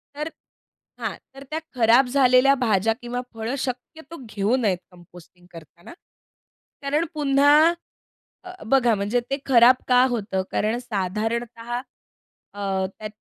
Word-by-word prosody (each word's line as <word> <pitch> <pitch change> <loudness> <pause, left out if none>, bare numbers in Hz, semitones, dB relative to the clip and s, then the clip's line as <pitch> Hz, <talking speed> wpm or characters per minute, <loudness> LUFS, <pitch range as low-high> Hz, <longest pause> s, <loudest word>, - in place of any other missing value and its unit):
तर 300 +2 -4 0.7
हां, - - -3 0.2
तर 275 - -10
त्या 315 - -2 0.2
खराब 240 +2 +4
झालेल्या 255 +1 +4
भाज्या 220 -1 +2
किंवा 245 +1 -4
फळं 225 +3 -4
शक्यतो 270 +5 -6
घेऊ 205 +3 0
नयेत 205 -8 0
कंपोस्टिंग 175 0 -18
करताना. 170 - -14 0.9
कारण 290 +3 0
पुन्हा 295 +2 +4 0.7
अ, 365 - -9 0.2
बघा 245 -4 +4
म्हणजे 205 +4 -1
ते 275 - -1
खराब 250 -1 +6
का 250 0 +5
होतं? 205 -5 -2
कारण 215 +3 0
साधारणतः 230 +2 -4 0.8
अ, 195 -2 -2 0.2
त्या 215 - -4
240 Hz, 125 wpm, -23 LUFS, 205-270 Hz, 0.9 s, खराब